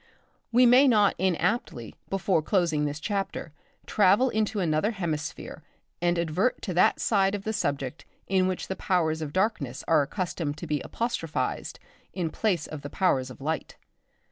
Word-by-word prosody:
We 245 +2 +6
may 250 +4 +7
not 210 -5 +4
inaptly 180 - -1 0.2
before 190 -3 +1
closing 165 -4 +1
this 145 +1 -3
chapter 195 -4 -3 0.3
travel 210 +5 +4
into 215 -1 0
another 160 +2 +1
hemisphere 170 -8 -4 0.4
and 175 0 +2
advert 170 +8 0
to 185 - -3
that 175 - +3
side 195 -2 +2
of 200 - -6
the 220 - -2
subject 140 - -3 0.2
in 185 -1 +2
which 185 -1 -3
the 190 - -3
powers 160 -5 0
of 150 -2 -4
darkness 185 - -1
are 160 -2 +4
accustomed 160 -1 -3
to 165 - -6
be 150 -3 -1
apostrophised 200 -9 -3 0.4
in 170 -4 -2
place 185 -8 0
of 155 -2 -8
the 145 - -7
powers 135 -9 +1
of 130 - -12
light. 160 +3 -3
180 Hz, 160 wpm, -27 LUFS, 155-200 Hz, 0.4 s, may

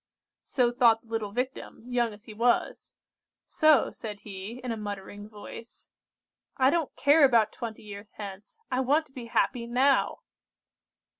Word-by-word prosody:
"So 245 -3 +1
thought 235 -2 +4
the 230 - -23
little 225 -3 -2
Victim, 250 0 -4
young 245 -2 0
as 210 0 -13
he 225 - -11
was; 235 +3 0 0.5
so, 310 -5 +4
said 210 -2 -8
he, 205 +3 -8
in 250 - -3
a - - -1
muttering 205 0 -7
voice:— 215 +2 -11 0.7
"'I 265 0 +4
don't 330 -3 -1
care 290 +2 +5
about 230 -5 +5
twenty 225 -2 -7
years 205 0 -10
hence; 200 - -9
I 255 - +1
want 290 +5 +2
to - - -26
be 255 -3 -8
happy 235 +1 0
now! 265 +3 +2
235 Hz, 155 wpm, -28 LUFS, 210-255 Hz, 0.7 s, care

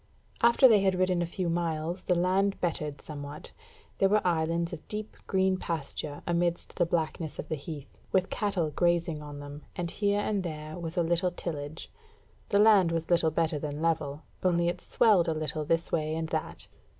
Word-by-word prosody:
After 235 +3 +7
they 220 -4 +6
had 190 -1 +2
ridden 185 -1 +2
a 170 - 0
few 180 +1 -3
miles 170 +1 -1
the 180 - +1
land 190 +3 +2
bettered 150 -4 -2
somewhat; 145 0 -8 0.5
there 195 - +4
were 210 0 +2
islands 170 0 +1
of 160 - -8
deep 215 0 -5
green 190 -1 +2
pasture 155 -3 -4
amidst 175 0 -1
the 175 - +2
blackness 160 -1 -2
of - - -5
the - - 0
heath, 145 -1 -8
with 190 0 +2
cattle 190 -7 0
grazing 170 -1 +1
on 145 -1 -8
them, 145 +1 -8
and 170 -1 -3
here 205 0 +1
and 205 -1 0
there 155 -3 -5
was 165 +1 -5
a 175 - +3
little 170 +2 +2
tillage: 155 -3 -6 0.6
the 200 - +3
land 205 -5 +6
was 165 +1 -2
little 170 -2 +4
better 160 -1 0
than 145 0 -4
level, 155 -2 -1 0.2
only 170 -2 +2
it 175 - -4
swelled 195 -7 +4
a 160 - 0
little 155 0 -2
this 165 +2 0
way 155 -1 0
and 160 0 -3
that. 160 -1 -3
170 Hz, 185 wpm, -29 LUFS, 155-185 Hz, 0.6 s, After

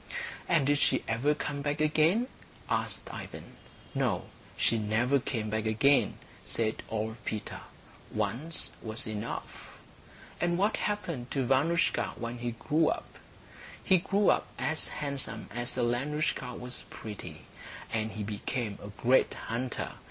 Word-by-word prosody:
"And 165 -6 +5
did 145 +1 +4
she 130 - +3
ever 130 +7 +2
come 145 -1 -3
back 145 +1 0
again?" 155 +9 +4 0.4
asked - - -1
Ivan. - - -8 0.4
"No, - - 0 0.3
she 115 - +3
never 115 +6 +3
came 115 -5 -2
back 110 0 0
again," 135 +6 +4 0.3
said 110 -1 -1
old 110 +1 -2
Peter. 110 - -3 0.5
"Once 155 +8 -1
was 110 0 -3
enough." 110 +1 -5 0.6
"And 175 0 +2
what 205 +4 +3
happened 175 -12 -2
to 135 -3 0
Vanoushka 155 +7 +3
when 120 0 -4
he 120 -1 -2
grew 155 +7 +2
up?" - - -4 0.6
"He 185 - +6
grew 195 +3 +4
up - - +1
as 155 +1 -1
handsome 140 -7 -3
as 120 +1 -1
Alenoushka 125 +1 0
was 125 0 -5
pretty. 105 -2 -7 0.5
And 110 -1 0
he 110 - -3
became 105 +1 -2
a - - -7
great 120 +5 +3
hunter. 120 +2 -2
125 Hz, 135 wpm, -31 LUFS, 110-150 Hz, 0.6 s, He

